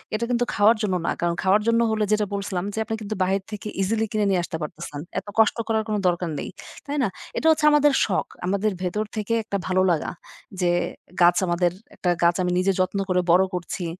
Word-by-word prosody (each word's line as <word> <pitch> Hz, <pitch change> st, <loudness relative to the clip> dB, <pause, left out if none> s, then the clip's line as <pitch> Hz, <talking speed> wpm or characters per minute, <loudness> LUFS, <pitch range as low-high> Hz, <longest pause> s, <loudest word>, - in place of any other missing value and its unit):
এটা 235 Hz, -, -1 dB
কিন্তু 245 Hz, 0 st, +1 dB
খাওয়ার 210 Hz, +3 st, +5 dB
জন্য 190 Hz, -3 st, 0 dB
না। -, -, +1 dB
কারণ 170 Hz, 0 st, +1 dB
খাওয়ার 195 Hz, +3 st, +4 dB
জন্য 230 Hz, 0 st, +4 dB
হলে 215 Hz, -1 st, +1 dB
যেটা 210 Hz, 0 st, +2 dB
বলছিলাম 195 Hz, -2 st, -2 dB
যে, 220 Hz, -, -3 dB
আপনি 225 Hz, -, -2 dB
কিন্তু 215 Hz, +1 st, -4 dB
বাহির 190 Hz, +1 st, +1 dB
থেকে 210 Hz, 0 st, -6 dB
ইজিলি 220 Hz, +3 st, +1 dB
কিনে 215 Hz, -1 st, +1 dB
নিয়ে 185 Hz, -2 st, +2 dB
আসতে 165 Hz, -1 st, -4 dB
পারতেছেন। 150 Hz, -1 st, -6 dB, 0.2 s
এত -, -, -17 dB
কষ্ট 220 Hz, +1 st, +4 dB
করার 220 Hz, -1 st, +1 dB
কোন 215 Hz, -, -1 dB
দরকার 175 Hz, -1 st, 0 dB
নেই। -, -, -5 dB, 0.4 s
তাই 290 Hz, +1 st, -3 dB
না? -, -, +3 dB, 0.3 s
এটা 320 Hz, -, +1 dB
হচ্ছে 305 Hz, -1 st, +2 dB
আমাদের 295 Hz, -1 st, +5 dB
শখ। 190 Hz, -, -1 dB, 0.2 s
আমাদের 200 Hz, +3 st, +1 dB
ভেতর 210 Hz, +4 st, -1 dB
থেকে 215 Hz, +1 st, -2 dB
একটা 200 Hz, -2 st, -2 dB
ভালো 185 Hz, 0 st, +2 dB
লাগা। 160 Hz, -, 0 dB, 0.5 s
যে 175 Hz, -, +3 dB, 0.5 s
গাছ 175 Hz, 0 st, +6 dB
আমাদের 175 Hz, 0 st, +2 dB, 0.2 s
একটা 180 Hz, -, -1 dB
গাছ 170 Hz, 0 st, +4 dB
আমি 180 Hz, -, 0 dB
নিজে 195 Hz, +1 st, +2 dB
যত্ন 185 Hz, +2 st, +1 dB
করে 180 Hz, 0 st, +3 dB
বড় 185 Hz, +2 st, +6 dB
করছি। 180 Hz, 0 st, -4 dB
200 Hz, 215 wpm, -24 LUFS, 180-215 Hz, 0.5 s, গাছ